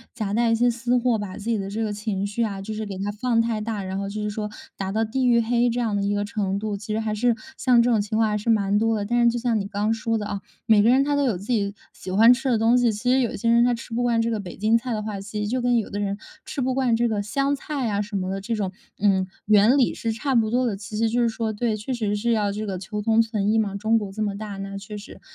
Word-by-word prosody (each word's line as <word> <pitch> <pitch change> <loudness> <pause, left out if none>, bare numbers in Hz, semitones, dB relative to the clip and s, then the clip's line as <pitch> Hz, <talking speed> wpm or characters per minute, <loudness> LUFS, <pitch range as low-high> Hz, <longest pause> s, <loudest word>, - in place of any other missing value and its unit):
夹 210 -4 -3
带 235 +1 +2
一 225 - +3
些 240 +2 +3
私 240 +1 0
货， 240 -2 +1
把 200 -2 -6
自 - - -9
己 225 -1 0
的 195 0 -4
这 220 +3 -2
个 210 -1 -2
情 205 -2 -2
绪 210 +3 -1
啊， 200 -3 -3
就 215 +3 -5
是 215 0 -4
给 195 -2 -6
它 200 +2 -2
放 230 +2 0
太 230 -2 0
大， 210 -2 -3
然 190 +1 -4
后 200 0 -3
就 210 +1 -4
是 210 - -2
说 210 0 -4 0.3
达 190 -1 -3
到 220 +2 +1
地 255 +4 0
狱 235 -1 +5
黑 240 +1 +2
这 240 +1 -1
样 225 -4 0
的 200 - 0
一 200 +1 0
个 205 0 -1
程 200 -2 -2
度， 210 0 -3
其 205 +1 -7
实 215 - 0
还 220 -1 -2
是 235 +2 +2 0.2
像 250 -2 +3
这 245 - +2
种 220 -3 +3
情 215 +2 -2
况 225 -1 +3
还 210 - 0
是 210 - -3
蛮 205 -2 +3
多 225 0 +1
的。 205 - -2
但 240 +3 +2
是 235 - +6
就 235 - -1
像 235 -2 0
你 195 - -3
刚 210 +2 0
说 225 0 -1
的 210 - -4
啊， 200 -1 -4 0.2
每 220 -2 +5
个 220 - +4
人 260 +2 +5
他 290 +1 0
都 285 - +2
有 235 -9 +1
自 195 - -10
己 200 -2 0 0.2
喜 185 - -9
欢 225 +5 +7
吃 265 +2 -2
的 240 - +3
东 225 +2 +3
西， 240 -2 +3
其 230 +4 -1
实 265 - +4
有 245 -3 0
些 230 - -3
人 235 0 +5
他 245 0 +3
吃 230 0 -9
不 240 - 0
惯 240 -1 +2
这 230 - -1
个 220 - -1
北 185 -4 -8
京 215 +3 +2
菜 245 +2 0
的 215 - -3
话， 210 -2 -4
其 205 +2 -6
实 210 - -1
就 250 +4 -1
跟 245 -1 +2
有 220 - -1
的 205 - -3
人 200 -1 -2 0.3
吃 275 - -4
不 260 0 0
惯 255 -3 +2
这 235 +1 +2
个 215 -3 -1
香 275 +7 0
菜 275 -2 -3
啊 205 -1 0
什 205 0 -6
么 185 -1 -1
的 195 - -3
这 230 +3 -2
种， 200 -3 -2 0.3
嗯， 190 -2 +2 0.2
原 215 +6 +5
理 255 - +3
是 230 - -2
差 265 +5 -2
不 225 -3 +3
多 250 +3 +1
的。 205 -5 -2
其 210 +1 -8
实 225 +1 +1
就 240 +2 +1
是 235 - +3
说 225 -1 -2
对， 220 +1 -1
确 215 +5 -4
实 215 -4 -1
是 235 +3 0
要 210 -3 +1
这 215 +1 -4
个 190 -3 -4
求 210 +3 -5
同 225 +2 +4
存 215 -2 0
异 225 - +3
嘛。 200 -2 -1
中 220 +3 +2
国 205 -3 -4
这 215 +2 -2
么 200 -1 -2
大， 210 -1 -6
那 195 0 -5
确 210 +1 -8
实 205 - -11
220 Hz, 345 characters per minute, -24 LUFS, 205-235 Hz, 0.3 s, 欢